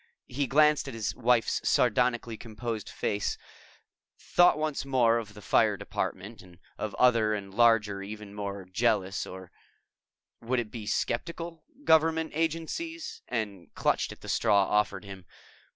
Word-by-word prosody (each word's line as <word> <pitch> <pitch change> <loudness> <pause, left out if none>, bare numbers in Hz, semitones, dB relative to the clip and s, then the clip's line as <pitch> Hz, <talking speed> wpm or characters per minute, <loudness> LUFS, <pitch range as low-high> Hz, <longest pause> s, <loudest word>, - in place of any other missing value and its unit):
He 140 +2 -1
glanced 150 +2 +4
at 135 - -6
his 110 -2 -2
wife's 120 -1 +2
sardonically 120 -1 +2
composed 115 0 -5
face, 100 -1 -2 0.8
thought 175 -2 +4
once 155 -2 -2
more 120 -4 +3
of 105 -2 -9
the 105 - -12
Fire - - +3
Department 105 +5 -4
and 90 -2 -17 0.2
of 110 -2 -5
other 115 -4 +4
and 100 -2 -7
larger 110 -3 +3
and 100 - -7
even 105 -1 -8
more 100 -2 -5
jealous 100 0 0
or 95 -1 -10 0.9
would 125 +2 0
it 110 -3 -4
be 110 -3 -7
skeptical? 165 +8 -3 0.2
government 160 - +3
agencies, 165 - -3
and 105 -7 -4
clutched - - +1
at - - -12
the - - -11
straw 100 -1 +3
offered 105 +2 0
him. 95 -2 -9
115 Hz, 145 wpm, -28 LUFS, 105-135 Hz, 0.9 s, glanced